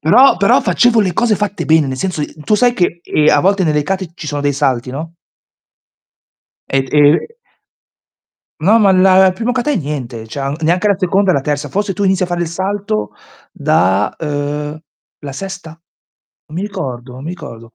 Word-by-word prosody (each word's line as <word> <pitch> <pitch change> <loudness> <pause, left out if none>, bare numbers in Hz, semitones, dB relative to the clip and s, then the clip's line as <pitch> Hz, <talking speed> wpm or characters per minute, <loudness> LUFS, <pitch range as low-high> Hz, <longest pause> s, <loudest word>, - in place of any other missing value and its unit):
Però 220 - +5
però - - +3
facevo 240 -2 +3
le 190 -4 0
cose 230 +3 +2
fatte 205 0 -3
bene, 160 -2 +4
nel 130 - -4
senso 180 -3 -2
i - - -5
tu 215 - +2
sai 245 +3 +3
che, 175 -6 -1
ehm, 150 - +1
a 145 - +4
volte 195 +2 +2
nelle 150 -2 +1
kate 185 +1 -3
ci 155 - -9
sono 145 -1 -3
dei 145 0 +1
salti, 130 -3 0
no? 160 +5 -7 1.5
E, 135 - +1
ehm 150 +1 +5 1.4
No, 210 +8 +4
ma 200 - +5
la 190 0 +5
il - - 0
primo 235 +4 -2
kata 255 +3 -1
è 285 - +1
niente, 130 - -5
cioè 135 +4 -4
neanche 180 +6 +2
la 200 - +2
seconda 190 +1 +2
e - - +2
la 140 - +1
terza. 145 +1 -3
Forse 200 +6 -2
tu 205 - -4
inizi 190 -1 +2
a - - -4
fare 175 0 -3
il 170 - -1
salto 190 - -3 0.4
da, 95 +3 +1
uhm, 150 0 -3 0.4
la 140 -2 -7
sesta? 190 +2 -7 0.8
Non 155 - -10
mi 190 - -2
ricordo, 125 -11 -6
non 130 - -10
mi 155 - -6
ricordo. 120 -10 -10
165 Hz, 195 wpm, -16 LUFS, 145-195 Hz, 1.5 s, Però